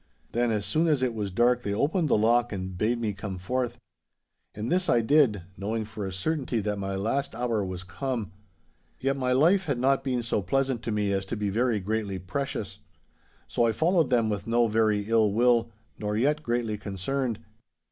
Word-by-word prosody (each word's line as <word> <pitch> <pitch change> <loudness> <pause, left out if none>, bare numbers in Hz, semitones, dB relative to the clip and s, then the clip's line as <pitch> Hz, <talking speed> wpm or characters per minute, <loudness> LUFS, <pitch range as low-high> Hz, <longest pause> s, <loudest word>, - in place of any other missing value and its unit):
Then 120 0 +1
as 105 -2 0
soon 160 +2 +1
as 145 -5 +2
it 125 -2 +1
was 105 -3 -3
dark 120 +5 +3
they 100 -3 -2
opened 155 - +1
the - - +4
lock 120 +3 +3
and 95 -2 -4
bade 115 +6 0
me 110 -3 -1
come 100 -1 -6
forth. 120 +5 -2 0.8
And 105 +6 -3
this 180 +1 +1
I 120 - +4
did, 115 - +3
knowing 110 +2 -2
for 105 -2 -5
a - - -5
certainty 130 - -1
that 105 0 -2
my 95 0 -3
last 115 +7 -1
hour 115 -3 0
was 95 -1 -5
come. 115 +2 -4 0.7
Yet 135 +1 0
my 130 -2 -1
life 170 +9 +4
had 140 -6 -1
not 135 +2 +2
been 125 -3 -1
so 115 -2 0
pleasant 130 +4 0
to 115 - -1
me 105 -2 0
as 95 0 0
to 115 - -3
be 105 -1 -1
very 115 +1 +1
greatly 100 0 -2
precious. 100 0 -4 0.7
So 115 - +2
I 115 - +1
followed 165 - +2
them 120 -3 +3
with 105 -1 -3
no 120 0 +3
very 110 -1 +2
ill 110 -2 +3
will, 120 0 +3 0.3
nor 105 0 -2
yet 145 +6 +2
greatly 120 -5 -1
concerned. 110 +5 -2
115 Hz, 200 wpm, -27 LUFS, 105-130 Hz, 0.8 s, the